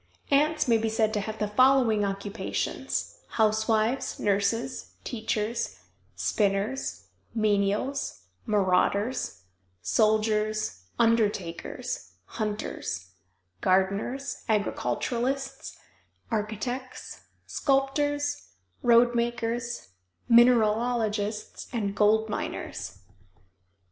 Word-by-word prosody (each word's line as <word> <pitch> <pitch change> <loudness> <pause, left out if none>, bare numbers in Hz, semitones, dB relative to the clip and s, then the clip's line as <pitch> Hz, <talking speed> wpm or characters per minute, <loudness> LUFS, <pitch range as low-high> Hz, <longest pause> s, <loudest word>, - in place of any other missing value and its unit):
Ants 300 +1 +3
may 230 -2 +4
be 225 0 0
said 220 0 +1
to 210 - +1
have 215 +2 -4
the 210 - 0
following 240 -1 +4
occupations: 200 - -3 0.2
Housewives, 220 +3 +1
nurses, 225 +5 0
teachers, 220 0 -2 0.4
spinners, 205 +5 0 0.3
menials, 210 - 0 0.3
marauders, 200 - +1 0.4
soldiers, 215 - +1
undertakers, 210 -7 0
hunters, 205 - -4 0.5
gardeners, 200 +9 0
agriculturalists, 240 - -1 0.5
architects, 225 +4 -4 0.2
sculptors, 290 +1 0 0.3
road 240 0 +5
makers, 235 - -2 0.4
mineralogists, 225 -2 +3
and 205 -5 -2
gold 220 +1 +4
miners. 100 - -5
220 Hz, 70 wpm, -27 LUFS, 205-245 Hz, 0.5 s, road